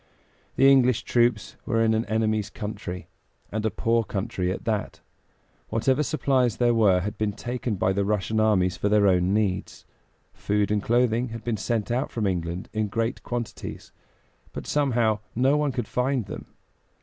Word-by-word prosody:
The 135 - +5
English 125 -4 +4
troops 120 -3 +1
were 115 - 0
in 115 0 +3
an 110 +1 0
enemy's 110 -1 0
country, 90 -4 -6 0.4
and 110 +1 -2
a 110 - +2
poor 115 +3 +1
country 95 -3 -2
at 95 - -6
that; 110 -3 -2 0.7
whatever 130 +5 +1
supplies 130 -5 +1
there 120 -1 +3
were 100 -5 +4
had 105 +3 -5
been 105 -1 0
taken 120 0 -3
by 95 0 +1
the 100 +1 0
Russian 105 +2 0
armies 95 -5 +2
for 105 - 0
their 105 -1 +4
own 90 -1 +3
needs. 100 -2 -1 0.5
Food 105 0 0
and 105 -1 +1
clothing 120 +1 +2
had 115 0 -7
been 120 -2 -1
sent 110 +2 -2
out 125 +4 0
from 110 -3 -2
England 90 -1 -2
in 110 -1 0
great 115 +3 -2
quantities, 120 -2 -6 0.6
but - - -6
somehow, 120 -7 +1 0.2
no 130 +4 +3
one 150 -1 +1
could 120 -3 -3
find 125 -2 0
them. - - -8
110 Hz, 170 wpm, -25 LUFS, 100-120 Hz, 0.7 s, The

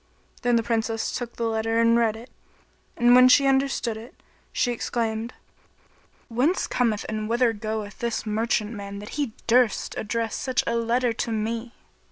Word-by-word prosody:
Then 245 -2 +2
the 230 - +2
Princess 225 -1 -1
took 240 -1 -5
the 235 - -3
letter 225 0 0
and 230 0 +4
read 230 -2 +2
it; 230 +3 -12 0.7
and 240 0 +5
when 255 +1 +8
she 275 +2 +6
understood 270 -4 +1
it, 230 +4 -11 0.4
she 250 -1 +1
exclaimed, 230 -1 -2 1.0
"Whence 270 +10 +1
cometh 225 -4 0
and 215 0 -3
whither 235 0 +2
goeth 215 -1 -5
this 235 -2 -2
merchant 215 0 0
man 200 -2 -7
that 205 +1 -8
he 280 -6 -3
durst 240 -1 +2
address 225 +1 -2
such 260 -2 0
a 235 - -1
letter 235 +1 +1
to 230 +1 -3
me?" 225 +2 -3
230 Hz, 165 wpm, -25 LUFS, 220-245 Hz, 1.0 s, when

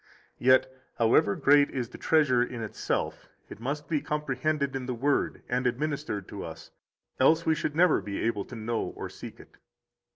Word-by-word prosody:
Yet, 130 +1 +4 0.2
however 110 -3 +4
great 145 0 +5
is 125 -3 -3
the - - -11
treasure 145 -6 +3
in 120 -1 -3
itself, 110 - -3 0.2
it - - -10
must 140 +5 -4
be 155 -3 0
comprehended 150 -1 -1
in 130 -1 -4
the 125 - -2
Word 140 +4 0
and 125 +1 0
administered 140 -5 -2
to - - -6
us, - - -9 0.5
else 160 +5 +4
we 160 - +4
should 155 -2 -2
never 175 0 +4
be 100 -1 -5
able 110 -3 -1
to 125 - -10
know 115 +1 -2
or - - -6
seek - - -10
it. - - -17
130 Hz, 175 wpm, -28 LUFS, 120-150 Hz, 0.5 s, great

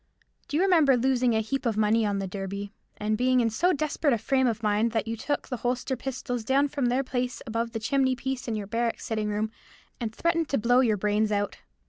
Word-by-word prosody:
"Do 290 - -1
you 350 - +3
remember 320 -9 +5
losing 250 -1 +2
a 220 - +2
heap 270 +5 -3
of 230 -4 0
money 215 +1 +3
on 200 -1 0
the 195 - -2
Derby, 200 +1 -5 0.2
and 215 +1 0
being 255 0 +3
in 230 -2 +2
so 355 +12 +2
desperate 305 -2 0
a - - -1
frame 260 +3 +1
of 230 -1 -2
mind 215 +2 +1
that 225 -1 0
you 225 - -2
took 285 +6 -3
the 250 - -3
holster 250 +2 -1
pistols 250 -2 -4
down 275 +4 +2
from 275 -3 -1
their 250 +3 +1
place 250 -1 -2
above 230 +1 -2
the 225 - -3
chimney 260 +3 +1
piece 265 0 -4
in 225 - -1
your 210 -1 -3
barrack 230 +3 -1
sitting 215 -2 -2
room, 215 +1 -1 0.5
and 230 -3 -3
threatened 335 -2 0
to 275 - +1
blow 245 +3 +3
your 225 -5 +3
brains 210 +2 +1
out? 205 0 -1
235 Hz, 230 wpm, -27 LUFS, 215-265 Hz, 0.5 s, remember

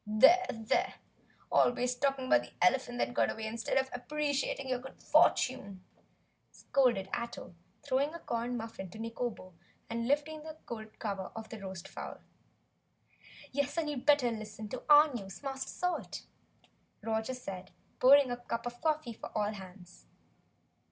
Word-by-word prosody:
"There! 270 +13 +6
There! 225 -1 0 0.6
Always 245 0 +3
talking 270 +1 0
about - - +5
the - - -12
elephant 245 -1 +3
that 245 - 0
got - - +3
away 220 - -4
instead 225 +3 -1
of 265 0 +3
appreciating 280 +1 -1
your 255 -1 0
good 265 +2 -11
fortune!" 200 -8 +3 0.7
scolded 240 -8 +1
Ato, 235 -5 -4 0.3
throwing 280 +1 +1
a - - -6
corn 240 -3 -2
muffin 225 -4 -6
down - - -16
to - - -9
Nikobo 230 -4 -4 0.4
and 230 0 -1
lifting 295 +3 0
the 315 0 -9
gold 220 -2 -8
cover 200 -4 -4
off 225 -1 -7
the 225 - -7
roast 190 -3 -7
fowl. - - -7 1.3
"Yes, 285 +3 -1
and 325 -2 +1
you'd 275 -1 -6
better 285 -5 +5
listen 215 -1 -6
to 255 - -5
OUR 295 0 +8
news, 195 0 -7
Master 270 -1 -3
Salt!" 360 0 -3 0.8
Roger 220 +3 -1
said, 190 -6 -7 0.3
pouring 275 0 +7
a 245 - -1
cup 235 -1 -4
of 240 0 -6
coffee 310 -6 0
for - - -8
all 210 0 +1
hands. 185 -2 -12
245 Hz, 155 wpm, -32 LUFS, 220-275 Hz, 1.3 s, OUR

